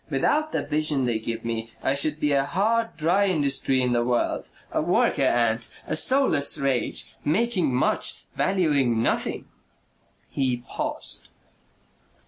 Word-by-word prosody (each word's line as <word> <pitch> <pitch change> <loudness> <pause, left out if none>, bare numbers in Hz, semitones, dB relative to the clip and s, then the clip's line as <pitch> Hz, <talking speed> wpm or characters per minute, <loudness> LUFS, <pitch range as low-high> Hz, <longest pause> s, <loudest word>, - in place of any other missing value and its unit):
Without 310 +1 +1
the - - -1
vision 150 -3 +1
they 115 -2 0
give 115 +1 -5
me, 115 -1 -3
I 135 - +2
should 150 +2 0
be 150 - +1
a 140 -1 +3
hard 225 +7 0
dry 180 +6 +2
industry 140 -6 +1
in 125 - +1
the 120 -1 +2
world, 120 0 -1 0.2
a - - 0
worker - - +1
ant, 115 -1 +1 0.2
a - - -2
soulless 255 - +3
rage, 135 -3 -1
making 185 - +1
much, 125 +1 0
valuing 145 -11 +1
nothing." - - -1 0.8
He 130 -3 -1
paused. - - -4
140 Hz, 135 wpm, -25 LUFS, 120-180 Hz, 0.8 s, a